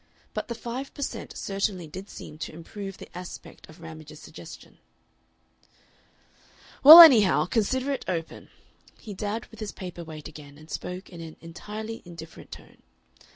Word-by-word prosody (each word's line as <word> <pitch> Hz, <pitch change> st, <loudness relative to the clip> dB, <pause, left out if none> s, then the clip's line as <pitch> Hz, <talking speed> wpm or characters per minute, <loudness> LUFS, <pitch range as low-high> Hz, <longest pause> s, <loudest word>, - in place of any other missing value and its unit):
But -, -, -4 dB
the 235 Hz, -, -4 dB
five 245 Hz, +4 st, -6 dB
per 285 Hz, -, -4 dB
cent. -, -, -6 dB
certainly 195 Hz, -2 st, -2 dB
did 190 Hz, +6 st, -9 dB
seem 150 Hz, -, -10 dB
to -, -, -5 dB
improve 195 Hz, +4 st, -8 dB
the -, -, -13 dB
aspect 180 Hz, -2 st, -10 dB
of 155 Hz, +1 st, -15 dB
Ramage's 155 Hz, -2 st, -11 dB
suggestion. -, -, -13 dB, 2.0 s
"Well, 315 Hz, +5 st, +14 dB
anyhow, 240 Hz, -, +7 dB
consider 260 Hz, +5 st, 0 dB
it 275 Hz, -, -4 dB
open." 165 Hz, -3 st, -5 dB, 0.5 s
He 215 Hz, -, -9 dB
dabbed 210 Hz, +3 st, -4 dB
with 225 Hz, -, -14 dB
his 215 Hz, -2 st, -5 dB
paper 180 Hz, -3 st, -8 dB
weight 155 Hz, -2 st, -9 dB
again, 145 Hz, -2 st, -13 dB
and 155 Hz, +1 st, -15 dB
spoke 180 Hz, +2 st, -6 dB
in 170 Hz, -2 st, -9 dB
an 160 Hz, -1 st, -9 dB
entirely 215 Hz, +7 st, -8 dB
indifferent 165 Hz, -2 st, -12 dB
tone. -, -, -13 dB
185 Hz, 155 wpm, -26 LUFS, 165-220 Hz, 2.0 s, Well